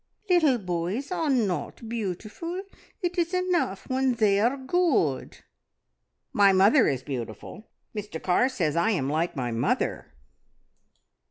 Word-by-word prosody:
"Leetle 315 -8 +4
boys 185 - -3
are 325 -4 0
not 225 -2 -1
beautiful. 230 - -4 0.4
It 355 +1 -1
is 345 +2 0
enough 360 - 0
when 260 0 +1
they 205 -3 +3
are 240 +6 +2
good." 265 - 0 1.0
"My 200 -1 +6
mother 205 +8 +5
is 130 -3 -1
beautiful. 130 - -7 0.3
Mr 205 -5 -5
Carr 190 +10 +2
says 155 - -1
I 170 +6 +2
am 145 -10 0
like 165 +3 -1
my 125 -3 -2
mother." 115 - -1
215 Hz, 125 wpm, -26 LUFS, 175-275 Hz, 1.0 s, My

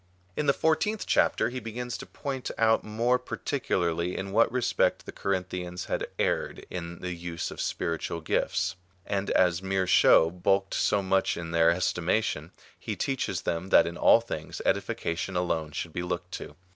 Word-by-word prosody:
In 150 - -1
the - - +7
fburteenth 195 +9 +1
chapter - - +2
he 130 +1 -4
begins 120 +1 -5
to - - -8
point 135 -3 -5
out 110 0 +3
more 115 +4 +1
particularly 90 - -1
in 95 0 -4
what 115 +3 +4
respect 125 -1 +1
the - - -7
Corinthians 90 -2 -3
had - - -2
erred - - -1
in 85 -1 -6
the 90 0 -3
use 85 -1 -5
of - - -5
spiritual 85 0 -2
gifts; 95 +3 0 0.3
and 100 0 -2
as 90 -1 +3
mere 95 0 0
show 80 -2 +6
bulked 95 +2 +1
so 100 -1 +2
much 95 0 +1
in 85 -1 -5
their 85 0 +4
estimation, 90 -1 0 0.3
he - - -4
teaches 135 -2 -2
them 85 +3 -2
that 85 - +6
in 85 0 -4
all 115 - +6
things 80 -9 -6
edifica 85 - 0
tion 90 +3 -4
alone 80 -3 -1
should 80 +2 -5
be 90 - -2
looked 90 0 -4
to. - - -7
90 Hz, 170 wpm, -28 LUFS, 85-110 Hz, 0.3 s, the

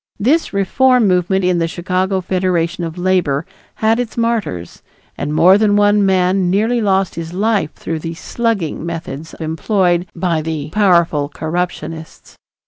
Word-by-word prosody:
This 290 +10 +1
reform 245 +4 +3
movement 185 +1 +1
in 180 -1 +2
the 165 - +1
Chicago 185 +2 -1
Federation 180 -2 -1
of 165 +1 -5
Labor 175 -5 +1 0.3
had 220 +2 +1
its 240 -2 -4
martyrs, 225 - -2 0.3
and 145 - -4
more 185 +6 +5
than 210 -1 +3
one 205 0 +4
man 185 -1 +2
nearly 225 +5 +1
lost 195 -2 +1
his 165 0 -6
life 205 -5 0
through 165 -1 -4
the 165 +1 -6
"slugging" 205 -5 -2
methods 165 -2 -6
employed 175 +2 0
by 170 -2 0
the 155 -1 -4
powerful 170 -7 +2
corruptionists. 160 0 -5
180 Hz, 140 wpm, -17 LUFS, 165-205 Hz, 0.3 s, more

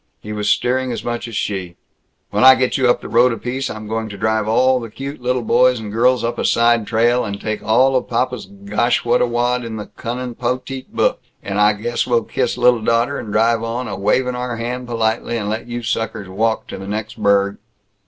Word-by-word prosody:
He 105 - -7
was 105 -1 -1
steering 130 +1 +1
as 115 -2 -4
much 120 0 -3
as 115 - -7
she. 95 -5 -3 0.6
"When - - +1
I 130 0 +10
get 130 -1 0
you 130 -2 +3
up 120 - +2
the - - -7
road 120 +2 +4
a 115 - -3
piece 130 +3 -3
I'm 110 0 -7
going 110 0 -3
to 100 - -8
drive 110 +1 0
all 130 +3 +3
the 115 -2 -7
cute 140 +5 -7
lil 125 0 0
boys 125 +2 +3
and 105 -2 -7
girls 125 +2 +3
up 120 +1 -2
a - - -1
side 115 -2 +3
trail, 120 +2 +2
and 100 -2 -4
take 110 0 -3
all 125 +5 +3
of 130 - 0
papa's 125 0 -1
gosh 100 +5 -1
what 120 +1 +3
a - - +3
wad 120 +1 0
in 115 -1 -5
the 105 -1 -5
cunnin' 125 +1 -4
potet 125 +2 -4
book, - - +1 0.2
and 100 +1 -1
I 105 +1 +5
guess 115 +3 -2
we'll 120 -2 +2
kiss - - -2
lil 120 -2 +4
daughter, 115 +5 +1
and 105 - -7
drive 115 +2 +2
on, 115 +2 -3
a 100 - -4
wavin' 115 +6 +1
our 125 -1 -3
hand 125 +2 -4
politely, 115 0 -1
and 105 -2 -3
let 110 +2 -4
you 120 0 -5
suckers 110 -3 -2
walk 110 +4 -1
to - - -6
the 95 - -8
next 110 +2 -5
burg." 100 0 +2
115 Hz, 230 wpm, -19 LUFS, 110-125 Hz, 0.6 s, I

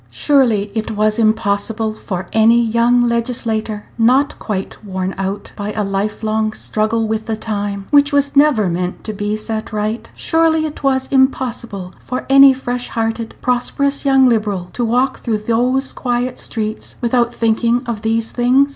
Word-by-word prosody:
Surely 235 -8 +2
it 220 -1 -3
was 215 +1 0
impossible 215 0 0
for 190 -4 -5
any 225 +2 +5
young 235 +1 +3
legislator 230 -3 -1
Page - - -26
154 - - +2
not 265 +5 +3
quite 200 0 -5
worn 190 -2 -3
out 195 +1 -4
by 205 0 -4
a 215 - -1
life 200 +2 -2
long 215 0 0
struggle 220 +1 -1
with 220 0 -3
the 220 - -1
time 205 -2 -3
which 285 -1 +5
was 285 0 +1
never 280 -8 +4
meant 180 +1 -3
to 215 - -5
be 205 +1 -2
set 215 0 -5
right 215 +2 -3
surely 325 -1 +2
it 300 - -6
was 265 -1 +1
impossible 235 -8 0
for 255 0 -4
any 275 0 +9
fresh 250 -1 -3
hearted, 225 0 -3
prosperous 265 +3 0
young 270 -2 +5
Liberal 205 -6 0
to 245 - -2
walk 250 +3 +1
through 225 -3 -1
those 245 +5 0
quiet 245 0 -2
streets 215 -1 -4
without 240 0 +1
thinking 230 +2 +1
of 235 -3 -4
these 225 0 -1
things. 255 +3 +3
225 Hz, 165 wpm, -17 LUFS, 215-250 Hz, -, any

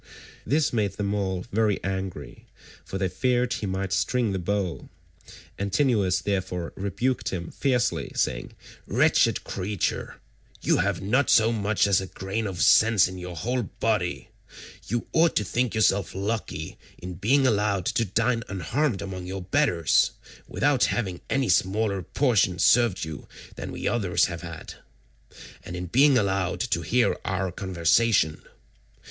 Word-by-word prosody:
This 145 +4 +1
made 105 -4 0
them 100 0 -2
all 95 -3 -2
very 105 -2 +1
angry, 95 -1 -5 0.4
for 95 - -5
they 95 0 0
feared 125 +6 0
he 105 - -3
might 95 0 -2
string 105 +8 +1
the 95 - -2
bow, 95 -1 -2 0.7
Antinous 100 -3 +1
therefore 95 -4 -3
rebuked 110 +7 -1
him 85 -2 -5
fiercely 125 -4 0
saying, - - -1 0.3
"Wretched - - +3
creature, 100 +1 -3 0.4
you - - +2
have 100 0 0
not 125 +7 +2
so 115 0 +5
much 105 -2 +1
as 100 -2 +3
a 95 - -6
grain 95 +4 -4
of 95 -1 -2
sense 110 -3 +5
in 95 0 -8
your 90 -1 -7
whole 125 +8 -1
body; 100 -5 -2 0.6
you 120 +2 -2
ought 165 +1 +3
to 105 - +2
think 120 +4 -1
yourself 100 -4 +2
lucky 105 +3 -4 0.2
in 90 0 -7
being 130 +11 +2
allowed 105 -5 +1
to 115 - +1
dine 115 +3 0
unharmed 100 - -1
among 95 -2 -6
your 95 0 -5
betters, 90 - +2 0.3
without 140 -3 +2
having 95 -7 -2
any 135 -1 +1
smaller 100 +2 +1
portion 105 -5 +1
served 115 -3 +3
you 80 -2 -8 0.3
than - - -6
we - - -4
others 100 -7 +2
have 85 -2 -5
had, 85 -2 -8 0.9
and 90 - -7
in 90 0 -4
being 135 - +4
allowed 95 -4 0
to 120 - -1
hear 125 0 +2
our 95 0 -2
conversation. 90 -1 +1
100 Hz, 145 wpm, -25 LUFS, 95-115 Hz, 0.9 s, so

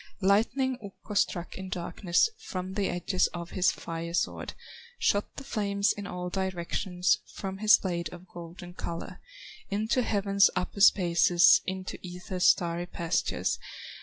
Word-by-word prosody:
Lightning 245 +6 +2
Ukko 200 +1 -9
struck 180 -3 -1
in 190 0 -6
darkness 175 - +1 0.2
From 185 0 -4
the 200 0 0
edges 180 +1 +1
of 170 0 -6
his 185 -1 +3
fire 170 0 -5
sword; - - -2 0.4
Shot 205 - 0
the 275 - -7
flames 200 -4 0
in 200 -1 -7
all 180 -1 -5
directions, 185 0 0 0.2
From 195 0 -5
his 215 0 +7
blade 170 -3 -3
of 180 +1 -11
golden 175 +1 -10
color, 170 -1 -6 0.5
Into 220 +5 +1
heaven's 200 -3 +3
upper 185 +2 -3
spaces, 175 -3 +6
Into 190 0 -4
Ether's 180 0 -2
starry 175 0 +2
pastures. 170 -2 -1
185 Hz, 135 wpm, -28 LUFS, 175-200 Hz, 0.5 s, his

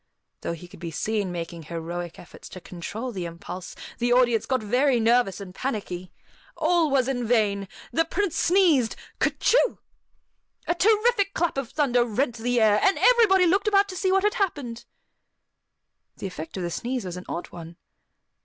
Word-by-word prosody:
Though - - -3
he 170 +1 -10
could 175 - -15
be 170 -1 -5
seen 205 +3 -2
making 170 -1 -5
heroic 170 +2 -6
efforts 175 - -13
to 185 - -9
control 205 +8 -6
the 185 -5 -4
impulse, 170 +2 -8 0.2
the 240 0 +1
audience 245 -2 +3
got 260 -4 0
very 250 +4 +2
nervous 230 -3 +2
and 190 -2 -9
panicky. 185 -7 -4 0.5
All 340 -3 +2
was 265 -3 +2
in 255 -2 -1
vain! 210 -4 +1 0.2
The 325 - +2
Prince 390 0 -1
sneezed, 335 - +3 0.2
"Ker - - +3
choo!" - - +3 0.9
A - - +1
terrific 420 +2 +2
clap 345 -1 0
of 270 -3 -3
thunder 255 -5 +2
rent 240 +2 -1
the 245 +2 0
air, 210 -2 +4
and 390 - +3
everybody 430 -7 +5
looked 390 +4 +2
about 400 -1 +4
to 370 - -6
see 375 +1 0
what 385 0 +3
had 420 0 +2
happened. 285 - -3 1.3
The - - -7
effect 180 -2 -6
of 185 - -3
the 170 - -3
sneeze 245 +3 -3
was 180 -1 -5
an 180 - -8
odd 175 - -5
one. 170 -1 -10
240 Hz, 175 wpm, -25 LUFS, -, 1.3 s, everybody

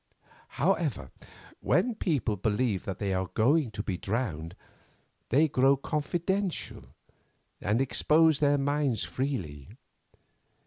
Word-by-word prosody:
However, - - 0 0.5
when 250 - +1
people 145 - -1
believe 105 +1 -1
that 95 -2 -4
they 100 -2 -1
are 95 0 -1
going 135 +4 +3
to 105 -1 -5
be 95 -5 -3
drowned 90 -7 -3 0.7
they 150 +6 +4
grow 135 0 +3
confidential, 170 +7 -2 0.8
and 105 +5 +1
expose 155 +3 +3
their 145 -1 +3
minds 140 -3 0
freely. 90 - -4
130 Hz, 105 wpm, -28 LUFS, 100-150 Hz, 0.8 s, they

